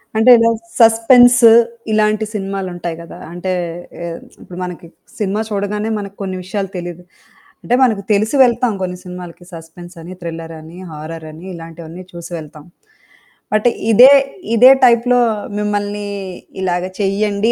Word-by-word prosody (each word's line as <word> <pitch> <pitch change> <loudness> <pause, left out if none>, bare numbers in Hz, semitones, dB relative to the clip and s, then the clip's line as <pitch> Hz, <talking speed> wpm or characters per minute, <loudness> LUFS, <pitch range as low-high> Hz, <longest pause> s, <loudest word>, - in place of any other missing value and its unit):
అంటే 225 +3 +5
ఇలా 230 0 +3 0.3
సస్పెన్స్ 240 +2 +6 0.5
ఇలాంటి 215 0 +1
సినిమాలుంటాయి 190 -4 -4
కదా! 170 - -11 0.2
అంటే 180 +2 -4 0.5
ఆహ్, 170 -1 -5 0.2
ఇప్పుడు 175 - -11
మనకి 180 -1 -7 0.3
సినిమా 210 0 -1
చూడగానే 210 +1 -2
మనకు 200 -1 -8
కొన్ని 190 -1 -4
విషయాలు 195 +1 -4
తెలీదు. 175 0 -7 0.6
అంటే 245 - +1
మనకు 220 -5 +2
తెలిసి 215 +6 +1
వెళ్తాం 240 -1 +1
కొన్ని 180 -1 -3
సినిమాలకి 180 -1 -10
సస్పెన్సని, 170 +1 -11
థ్రిల్లరని, 165 0 -8
హారరని, 155 +2 -9
ఇలాంటివన్నీ 165 +1 -10
చూసి 170 0 -9
వెళ్తాం. 150 -1 -11 0.9
బట్ 215 +3 +2 0.2
ఇదే 250 +5 +8 0.4
ఇదే 250 +3 +8
టైప్‌లో 245 +1 +4 0.4
మిమ్మల్ని 205 0 -2 0.5
ఇలాగ 180 -1 -1 0.2
చెయ్యండి 200 +2 0
195 Hz, 120 wpm, -17 LUFS, 170-215 Hz, 0.9 s, ఇదే